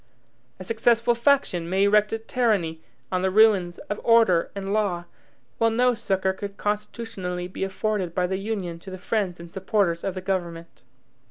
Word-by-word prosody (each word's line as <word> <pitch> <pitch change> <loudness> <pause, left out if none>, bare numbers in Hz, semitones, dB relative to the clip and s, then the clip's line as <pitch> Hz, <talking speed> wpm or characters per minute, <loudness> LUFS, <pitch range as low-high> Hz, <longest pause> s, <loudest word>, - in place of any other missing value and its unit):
A 185 - -8
successful 230 +3 +2
faction 235 -9 +1
may 190 +2 +2
erect 210 +1 +4
a 225 - 0
tyranny 215 -9 0 0.3
on 185 -1 0
the 190 - +1
ruins 190 -4 +4
of 205 - -6
order 225 -7 +4
and 195 0 -3
law, 190 -5 0 0.5
while 230 - +4
no 245 +2 +3
succor 190 -4 -1
could 200 +1 -7
constitutionally 205 -4 -3
be 185 - -5
afforded 195 -2 -2
by 180 - +2
the 190 +1 -2
Union 195 -5 -4
to 190 - -11
the 185 - -7
friends 185 -2 -2
and 170 0 -10
supporters 190 -3 0
of 195 - -2
the 185 - -4
government. 170 -3 -4
195 Hz, 170 wpm, -25 LUFS, 180-220 Hz, 0.5 s, erect